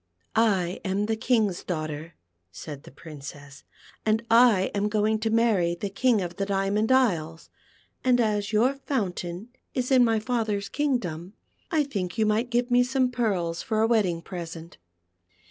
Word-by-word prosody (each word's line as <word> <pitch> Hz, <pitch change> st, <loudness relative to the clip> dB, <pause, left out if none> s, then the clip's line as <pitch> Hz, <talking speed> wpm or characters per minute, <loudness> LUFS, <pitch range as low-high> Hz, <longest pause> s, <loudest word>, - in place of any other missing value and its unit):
" -, -, -42 dB, 0.3 s
I 175 Hz, +2 st, -5 dB
am 195 Hz, +1 st, 0 dB
the 220 Hz, +1 st, 0 dB
King's 220 Hz, -5 st, +1 dB
daughter," 155 Hz, -1 st, -5 dB, 0.4 s
said 140 Hz, -, -9 dB
the -, -, -12 dB
Princess, 145 Hz, -1 st, -11 dB, 0.2 s
" -, -, -24 dB
and 220 Hz, +1 st, +1 dB
I 230 Hz, -5 st, +5 dB
am 205 Hz, +1 st, 0 dB
going 215 Hz, +1 st, +1 dB
to 220 Hz, +1 st, -1 dB
marry 220 Hz, -7 st, +2 dB
the 195 Hz, +3 st, -5 dB
King 235 Hz, 0 st, +2 dB
of 175 Hz, 0 st, -6 dB
the 195 Hz, -, -1 dB
Diamond 200 Hz, +3 st, 0 dB
Isles, 170 Hz, -11 st, +1 dB, 0.5 s
and 250 Hz, -1 st, +3 dB
as 210 Hz, -2 st, 0 dB
}'our 230 Hz, +5 st, +3 dB
fountain 195 Hz, -6 st, -3 dB, 0.3 s
is 250 Hz, +1 st, -1 dB
in 255 Hz, -2 st, +6 dB
my 225 Hz, -2 st, +3 dB
father's 215 Hz, -3 st, -2 dB
kingdom, 200 Hz, -, -2 dB, 0.4 s
I 315 Hz, -4 st, +2 dB
think 200 Hz, -9 st, -4 dB
you 220 Hz, -, +3 dB
might 215 Hz, +3 st, +1 dB
give 245 Hz, +1 st, 0 dB
me 245 Hz, 0 st, +5 dB
some 255 Hz, 0 st, +1 dB
pearls 190 Hz, -9 st, -1 dB
for 220 Hz, -1 st, -1 dB
a 225 Hz, -, +4 dB
wedding 190 Hz, -8 st, +1 dB
present." 170 Hz, -, -8 dB
210 Hz, 165 wpm, -26 LUFS, 175-235 Hz, 0.5 s, in